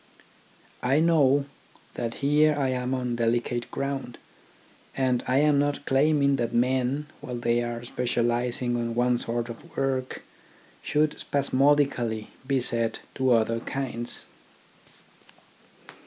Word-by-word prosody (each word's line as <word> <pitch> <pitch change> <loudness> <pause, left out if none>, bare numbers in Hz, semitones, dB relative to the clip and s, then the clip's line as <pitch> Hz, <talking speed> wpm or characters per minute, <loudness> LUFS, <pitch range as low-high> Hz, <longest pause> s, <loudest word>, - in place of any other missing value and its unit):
I 135 +4 +2
know 145 -4 +4 0.5
that 115 -1 -3
here 150 +1 +4
I 135 -2 +1
am 125 0 -1
on 125 -2 -2
delicate 120 +1 0
ground, 135 -3 -4 0.8
and 130 -2 +1
I 130 - +2
am 145 0 +4
not 145 0 -1
claiming 140 0 +3
that 120 -2 -2
men 130 +4 +1
while 130 -4 -6
they 120 0 +1
are 120 0 -4
specialising 120 0 0
on 115 -1 -2
one 120 0 +2
sort 120 0 -2
of 115 -1 -11
work 130 -1 -2 0.6
should 150 0 0
spasmodically 135 -5 +1 0.2
be 135 -1 +2
set 115 -2 -1
to 130 -1 +2
other 115 0 +2
kinds. 120 -1 -4
125 Hz, 120 wpm, -26 LUFS, 120-140 Hz, 0.8 s, know